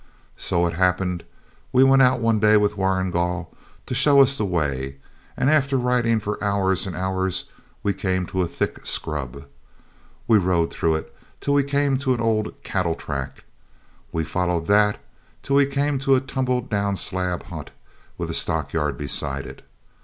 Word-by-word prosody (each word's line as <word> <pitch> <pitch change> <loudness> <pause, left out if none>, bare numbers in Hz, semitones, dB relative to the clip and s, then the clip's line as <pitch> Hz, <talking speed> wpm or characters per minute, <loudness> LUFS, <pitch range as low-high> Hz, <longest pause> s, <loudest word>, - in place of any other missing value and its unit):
So 85 0 0
it 85 - -1
happened 90 0 0 0.5
we 130 +1 +5
went 135 0 +6
out 125 -1 +4
one 115 -1 +2
day 105 0 +5
with 105 0 +1
Warrigal 90 -3 -1 0.3
to - - -5
show 140 +2 +5
us 135 0 +5
the 110 - -1
way, 70 -7 -2 0.4
and - - +1
after 140 -2 +3
riding 120 -2 +2
for 105 0 -4
hours 95 -1 +1
and 90 - -5
hours, 95 0 -2 0.3
we 100 - +1
came 95 -1 -1
to 95 0 -2
a 90 - 0
thick - - -3
scrub. 70 -2 -2 0.8
We 110 - +5
rode 85 -3 +1
through 80 -1 +1
it 80 - -6 0.2
till 140 - 0
we 140 0 +4
came 140 -1 +1
to 130 -2 +1
an - - -6
old 110 -2 0
cattle 85 -4 -1
track. 70 -3 -6 0.7
We 80 - -1
followed 90 0 -1
that 105 +2 +3 0.5
till 140 0 +1
we 140 -1 +5
came 140 0 0
to 135 0 +3
a - - +3
tumble 130 -1 -1
down 100 -3 -1
slab 90 -2 -1
hut - - -8 0.5
with - - -3
a - - -4
stockyard 75 -5 0
beside 70 +1 -2
it. - - -10
100 Hz, 170 wpm, -23 LUFS, 85-125 Hz, 0.8 s, went